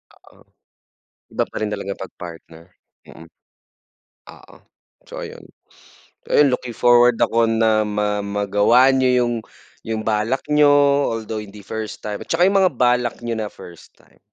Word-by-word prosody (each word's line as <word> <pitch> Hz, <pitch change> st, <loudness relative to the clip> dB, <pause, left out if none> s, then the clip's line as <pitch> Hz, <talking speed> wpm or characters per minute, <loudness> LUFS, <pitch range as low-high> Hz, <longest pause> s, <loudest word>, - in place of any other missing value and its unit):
Oo. -, -, -23 dB, 0.9 s
Iba -, -, 0 dB
pa -, -, -12 dB
rin 105 Hz, -1 st, -2 dB
talaga 100 Hz, -1 st, -6 dB
pag -, -, -29 dB
partner, 85 Hz, -1 st, -11 dB, 0.4 s
mm. 80 Hz, 0 st, -14 dB, 1.1 s
Oo, -, -, -18 dB, 0.5 s
so -, -, -8 dB
ayun. -, -, -9 dB, 0.9 s
Ayun 140 Hz, -3 st, +4 dB
looking 125 Hz, -1 st, -4 dB
forward 120 Hz, 0 st, +5 dB
ako 115 Hz, 0 st, +2 dB
na 110 Hz, -1 st, +2 dB
ma 105 Hz, 0 st, -2 dB
magawa 105 Hz, +6 st, +3 dB
niyo 125 Hz, -2 st, +2 dB
yung, 120 Hz, -, -1 dB, 0.5 s
yung 110 Hz, -1 st, -3 dB
balak 110 Hz, +4 st, -1 dB
niyo, 150 Hz, -1 st, +4 dB, 0.5 s
although 110 Hz, -1 st, -5 dB
hindi 100 Hz, -1 st, -13 dB
first 110 Hz, -1 st, -6 dB
time 105 Hz, -1 st, -5 dB
at -, -, -11 dB
saka 175 Hz, +2 st, +3 dB
yung 195 Hz, 0 st, +3 dB
mga 185 Hz, -, +3 dB
balak 125 Hz, -1 st, +1 dB
niyo 115 Hz, -, -2 dB
na 110 Hz, -2 st, -4 dB
first 85 Hz, -2 st, -14 dB
time. -, -, -27 dB
110 Hz, 150 wpm, -20 LUFS, 105-125 Hz, 1.1 s, forward